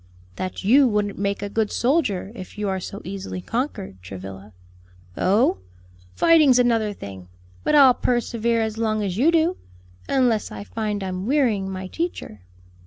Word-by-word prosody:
"That 185 +1 -4
you 260 +7 +6
wouldn't 210 -3 -1
make 200 0 -1
a - - -2
good 220 0 0
soldier, 240 - 0
if 185 -5 -10
you 210 -1 -2
are 190 0 -1
so 200 +3 -8
easily 190 -1 -5
conquered, 210 - -4
Travilla." 95 +2 -9 0.6
"Oh, 200 - +2 0.6
fighting's 310 -6 +5
another 230 -4 +2
thing, 95 - -9 0.4
but - - +2
I'll 270 -3 +8
persevere 235 -2 0
as 220 0 -4
long 215 -2 0
as 190 -2 -3
you 290 +8 +4
do; 335 +2 +2 0.5
unless 245 -6 +2
I - - -7
find 210 -2 -3
I'm 185 +1 -4
wearying 235 -9 +1
my 190 0 -5
teacher." 255 - -5
210 Hz, 155 wpm, -23 LUFS, 190-250 Hz, 0.6 s, I'll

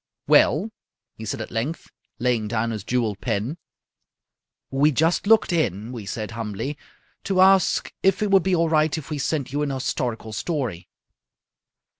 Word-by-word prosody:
"Well?" 190 +10 +4 0.4
he 110 - -8
said - - -3
at - - -7
length, 125 +9 -3 0.3
laying 120 -3 0
down 115 +1 -1
his 110 -3 -5
jewelled 110 -4 -1
pen. 120 - -2 1.1
"We 140 +3 +3
just 165 +7 +1
looked 220 -4 +4
in," 110 - -1
we 115 -5 -7
said, 110 +1 -4
humbly, 115 +5 -4 0.5
"to 190 -2 0
ask 190 0 +4
if 195 +2 +2
it 205 - 0
would 195 -1 +6
be 185 +1 +1
all 165 -1 +2
right 155 0 +2
if 155 0 -8
we 150 - -2
sent 140 -2 -2
you 145 - 0
an 145 - 0
historical 125 -4 -3
story." 110 - -3
135 Hz, 160 wpm, -23 LUFS, 110-165 Hz, 1.1 s, would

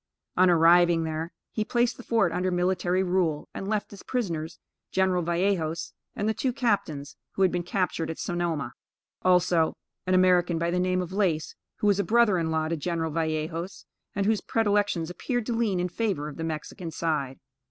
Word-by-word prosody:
On 185 0 +5
arriving 170 0 +5
there, 160 +1 -3 0.2
he 215 - -1
placed 240 +2 +1
the - - -10
fort 225 -7 +2
under 180 +2 0
military 180 +1 +1
rule, 175 -5 0
and 195 - -5
left 215 0 -1
his 200 - -10
prisoners, 170 -10 -3 0.3
General 190 -1 +2
Vallejos 170 -1 -1 0.2
and 205 - -1
the 220 - +2
two 260 +3 -1
captains, 160 - -1 0.2
who 195 - +1
had 185 - +4
been 175 - -1
captured 175 -2 -1
at 160 - -4
Sonoma. 170 -7 -2 0.5
Also 180 -3 +3 0.3
an 185 - +3
American 180 -2 +4
by 170 +1 0
the 180 - +1
name 185 0 +1
of 180 +1 -8
Lace, 180 -6 0 0.2
who - - -3
was 205 -1 +4
a - - +3
brother 225 -5 +4
in 165 -1 -1
law 160 -1 0
to 165 - -1
General 165 0 -2
Vallejos, 160 +3 -3 0.3
and 200 0 0
whose 215 0 +2
predilections 205 -6 +1
appeared 245 +5 -2
to 240 - -1
lean 225 -5 +1
in 180 - 0
favor 180 -5 -2
of 150 - -8
the 165 - -4
Mexican 165 +2 -5
side. 150 -5 -2
180 Hz, 185 wpm, -27 LUFS, 165-200 Hz, 0.5 s, On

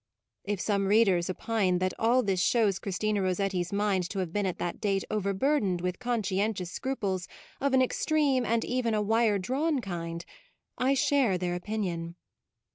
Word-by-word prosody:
If 205 -1 -2
some 200 +2 0
readers 195 -5 +3
opine 190 -1 0
that 185 0 0
all 240 +3 +3
this 195 -2 0
shows 205 +1 +2
Christina 205 +1 -1
Rossetti's 185 -1 -1
mind 200 -3 0
to 200 - -6
have 180 -3 -2
been 205 -2 0
at 180 - -3
that 175 - -4
date 195 -2 +1
overburdened 200 0 +1
with 180 0 -2
conscientious 210 -6 -1
scruples 195 -9 -2 0.3
of 280 0 0
an 260 - +5
extreme 280 -1 +1
and 230 -1 0
even 245 -3 0
a 210 - +1
wire 220 0 +2
drawn 275 - 0
kind, 170 -5 -5 0.5
I 265 +2 +2
share 265 -8 +2
their 180 0 -2
opin 210 +5 -3
ion. 170 -2 -4
200 Hz, 165 wpm, -29 LUFS, 185-230 Hz, 0.5 s, an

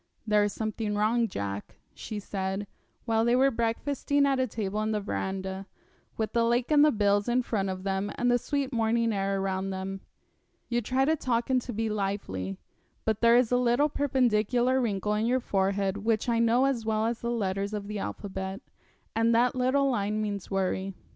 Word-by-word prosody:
'There 210 -1 +3
is 205 - -1
something 215 0 -3
wrong, 225 +3 +2
Jack,' 100 - -5 0.2
she 215 - -6
said, 195 0 -3 0.4
while 225 -1 +2
they 235 +1 +3
were 270 +2 +4
breakfasting 275 +5 0
at 275 -1 +2
a 260 - +1
table 210 -2 -3
in 215 0 -1
the 215 - 0
verandah, 190 -1 -4 0.5
with 220 -1 -2
the 235 -1 +3
lake 240 +4 +1
and 295 -1 +6
the 305 - +6
bills 205 -1 +2
in 250 +1 +2
front 200 -5 -1
of 185 0 -5
them 195 +1 -1
and 245 0 +1
the 245 - +3
sweet 280 0 -2
morning 230 0 +1
air 195 0 0
around 190 0 -2
them. 190 0 -4 0.7
'You 240 0 +1
try 255 +4 +1
to 315 +3 +3
talk 240 -4 -1
and 255 -1 +3
to 245 - -6
be 225 0 -1
lively, 195 - -3 0.5
but 220 -1 0
there 235 0 +6
is 245 -2 +2
a 245 - +4
little 250 +4 +3
perpendicular 250 -2 +2
wrinkle 210 -3 -1
in 215 +2 0
your 255 +2 +2
forehead 195 -3 0
which 220 +2 0
I 230 -1 +2
know 235 +3 +4
as 265 -4 0
well 220 0 0
as 230 0 -1
the 235 - -2
letters 200 -3 -1
of 205 -1 -4
the 210 0 -4
alphabet, 190 -1 -5 0.6
and 230 +1 +3
that 245 +1 +3
little 260 +2 +2
line 210 -4 0
means 205 -3 -3
worry. 195 0 -1
220 Hz, 195 wpm, -28 LUFS, 195-245 Hz, 0.7 s, and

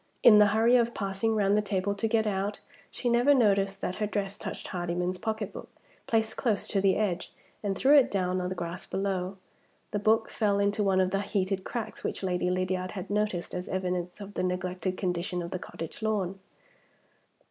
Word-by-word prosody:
In 210 -3 +9
the 210 - +7
hurry 225 +4 +4
of 235 -1 +1
passing 200 +3 -1
round 200 -1 +3
the 210 - +3
table 200 -1 -1
to 200 +2 -1
get 220 0 +2
out, 205 0 -1 0.3
she 250 - -4
never 240 +4 +5
noticed 195 -5 +2
that 185 - -3
her 210 - 0
dress 200 -1 -2
touched - - -6
Hardyman's 180 +1 -2
pocketbook, 220 -2 -4 0.4
placed 220 -1 0
close 220 -6 0
to 195 - +1
the 195 -1 +4
edge, 190 -5 -1 0.3
and 195 -2 -2
threw 280 +3 +5
it 265 - +2
down 185 -2 0
on 180 - -2
the 185 - -3
grass 175 0 -5
below. 190 -1 -2 0.5
The 205 - -1
book 220 +2 +2
fell 205 -3 +1
into 200 +1 +1
one 190 -2 +3
of 185 0 +1
the 195 +1 +1
heat 195 -2 -1
cracks 230 +1 -5
which - - -3
Lady 180 -1 0
Lydiard 185 0 -1
had 190 -1 -6
noticed 210 -4 -1
as 180 - -4
evidence 180 0 -2
of 200 0 -8
the - - -2
neglected 185 0 -2
condition 180 -1 -2
of 170 - -6
the 185 - -3
cottage 165 +1 -8
lawn. 195 -3 -1
195 Hz, 195 wpm, -29 LUFS, 185-210 Hz, 0.5 s, In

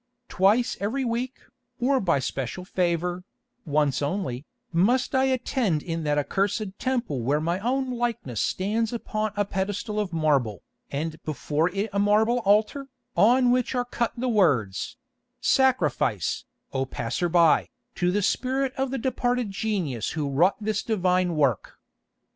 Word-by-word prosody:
Twice 215 +6 +2
every 250 +7 -1
week, 245 +2 -3 0.4
or 265 +2 +2
by 175 - +2
special 135 +6 -4
favour, 180 -1 -1 0.4
once 145 -2 +1
only, 145 -4 -3 0.3
must 245 - +2
I 265 0 +3
attend 250 - 0
in 165 -1 -3
that 150 0 +1
accursed 195 +6 -1
temple 240 - -1
where 140 +6 +1
my 170 +4 -1
own 255 +4 -1
likeness 235 - -2
stands 215 +4 0
upon 215 -2 -2
a 205 0 +1
pedestal 205 +3 -2
of 205 -4 -2
marble, 140 - +1 0.3
and 155 +3 -4
before 155 +2 -1
it 200 +4 -2
a 200 - +1
marble 215 +4 +3
altar, 220 +6 +2 0.3
on 245 +3 +5
which 250 +1 +1
are 245 0 0
cut 240 -1 -2
the 255 +2 -1
words: 155 - +1 0.4
'Sacrifice, 175 - +1 0.3
O 135 - 0
passer 170 +11 -2
by, 170 -2 +4 0.2
to 175 - 0
the 205 +2 0
spirit 260 +4 0
of 265 0 0
the 270 - -2
departed 245 -3 -1
genius 185 - -2
who 145 -2 -1
wrought 170 +8 +3
this 215 0 -1
divine 185 -5 +1
work. 140 -9 0
200 Hz, 145 wpm, -25 LUFS, 155-240 Hz, 0.4 s, on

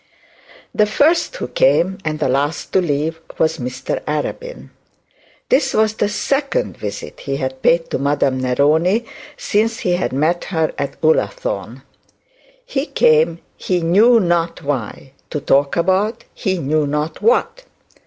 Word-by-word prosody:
The 210 - +3
first 320 - +2
who - - -4
came 190 - +2
and 155 -1 -2
the 150 - 0
last 145 +3 -1
to 190 - +4
leave 160 0 -2 0.2
was 160 0 +1
Mr 125 +1 -4
Arabin. 155 - -4 0.8
This 270 - +2
was 220 0 +3
the 210 -1 0
second 280 - -1
visit - - -7
he 135 -1 -3
had 130 -1 -4
paid 165 +3 +2
to - - -1
Madame 140 -2 +1
Neroni 155 - +2 0.3
since 220 +2 0
he 180 - 0
had 185 - -2
met 155 +6 0
her 160 -4 -1
at 140 - -4
Ullathorne. - - 0 0.8
He 290 - -2
came 160 +2 +3
he 180 -2 -1
knew 215 +8 +5
not 170 -3 0
why, 135 -2 -4 0.2
to 150 - -3
talk 140 0 +2
about 190 +5 +1
he 190 -3 -2
knew 155 -1 0
not 150 +2 -3
what. - - +1
165 Hz, 145 wpm, -18 LUFS, 145-215 Hz, 0.8 s, knew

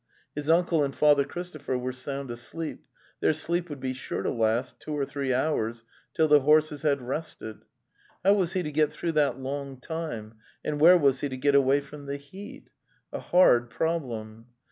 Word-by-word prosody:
His 150 +1 -4
uncle 165 -2 +3
and 135 -1 -2
Father 145 -2 +5
Christopher 155 -3 -5
were 125 +1 -3
sound 135 0 -5
asleep; 150 +7 -6 0.3
their - - +3
sleep 170 +3 -2
would 145 -2 -6
be 130 0 -2
sure 130 - -5
to - - 0
last 115 +2 0
two 150 -1 -5
or 140 - 0
three 140 -1 -3
hours 120 -4 0 0.3
till 160 - +3
the 150 -1 +7
horses 150 +1 +3
had 140 -4 +1
rested.... 125 -5 -5 0.6
How 200 - +7
was 190 -3 +1
he 185 -2 0
to 150 - -4
get 150 0 +2
through 165 +2 -3
that 145 -5 +2
long 135 0 -5
time, 120 -8 -6 0.3
and 150 -1 -2
where 175 +3 +9
was 140 -4 +3
he 145 - -2
to 130 - -5
get 140 +2 +2
away 140 0 +4
from 145 0 -11
the 140 0 -3
heat? 185 +9 -12 0.4
A - - -3
hard 120 -10 +4
problem. 115 -7 -3
145 Hz, 190 wpm, -27 LUFS, 130-155 Hz, 0.6 s, where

